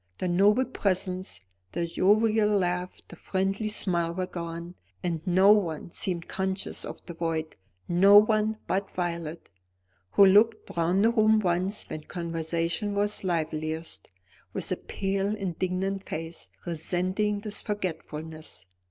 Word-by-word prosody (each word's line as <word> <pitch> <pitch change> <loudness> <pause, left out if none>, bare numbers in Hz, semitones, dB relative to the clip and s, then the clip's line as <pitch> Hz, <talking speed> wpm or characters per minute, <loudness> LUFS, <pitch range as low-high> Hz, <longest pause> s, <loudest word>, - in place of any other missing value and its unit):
The 185 - -2
noble 205 +8 +4
presence, 185 - -2 0.3
the 170 +1 -1
jovial 210 +5 +3
laugh, 180 -3 0
the - - -11
friendly 195 +4 -1
smile 175 -5 0
were 185 0 -1
gone, 170 0 -6 0.3
and 170 -3 -1
no 190 +3 +6
one 170 -6 +1
seemed 175 -2 -2
conscious 190 0 -2
of - - -8
the 170 - -7
void 165 -1 -2 0.3
no 195 +4 +7
one 215 0 +4
but 195 +1 -1
Violet, 170 - -4 0.6
who 200 - +8
looked 215 +3 +4
round 175 +5 +2
the 230 - +5
room 220 -2 +4
once 185 +1 -1
when 155 - -6
conversation 170 +3 -2
was 205 0 0
liveliest, 160 - -3 0.4
with - - -1
a - - +2
pale 195 +1 -2
indignant 190 0 -2
face, 165 +1 -6 0.2
resenting 185 +5 -1
this 210 -1 -5
forgetfulness. 160 - -5
185 Hz, 130 wpm, -27 LUFS, 170-205 Hz, 0.6 s, who